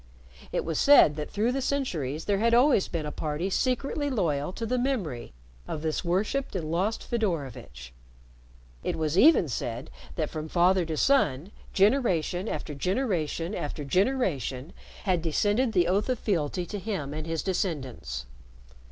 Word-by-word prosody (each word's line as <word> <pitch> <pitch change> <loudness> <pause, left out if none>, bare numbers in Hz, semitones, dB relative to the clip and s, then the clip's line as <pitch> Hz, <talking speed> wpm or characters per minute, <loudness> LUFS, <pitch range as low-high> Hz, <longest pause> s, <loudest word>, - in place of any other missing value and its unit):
It - - -1
was 165 -2 -1
said 280 - +7
that 150 - -4
through 220 +4 0
the 270 +1 -1
centuries 165 - -2
there 200 -1 +1
had 230 +2 +3
always 250 -4 +4
been 160 -3 -3
a 150 - -4
party 155 +6 -3
secretly 275 +6 0
loyal 165 - 0
to 230 - -4
the 250 +2 0
memory 205 - -2 0.4
of 155 - -4
this 155 -1 -1
worshiped 200 +9 -1
and 160 -4 -3
lost 190 +7 0
Fedorovitch. 140 - -3 0.9
It - - -1
was 155 -1 -1
even 270 - +6
said 120 -1 -4 0.2
that 155 -3 -2
from 155 0 -5
father 180 +1 +3
to 160 -1 -3
son, 180 - +2 0.2
generation 195 - +2
after 150 - -4
generation 180 - -1
after 150 -4 -4
generation, 170 - 0 0.3
had 185 -5 +1
descended 205 - +1
the 180 -4 +3
oath 200 +6 +1
of 255 - +1
fealty 175 -4 -1
to 205 +3 -5
him 185 -9 -4
and 155 +1 -5
his 165 -1 -2
descendants. 135 - -3
180 Hz, 155 wpm, -27 LUFS, 150-220 Hz, 0.9 s, said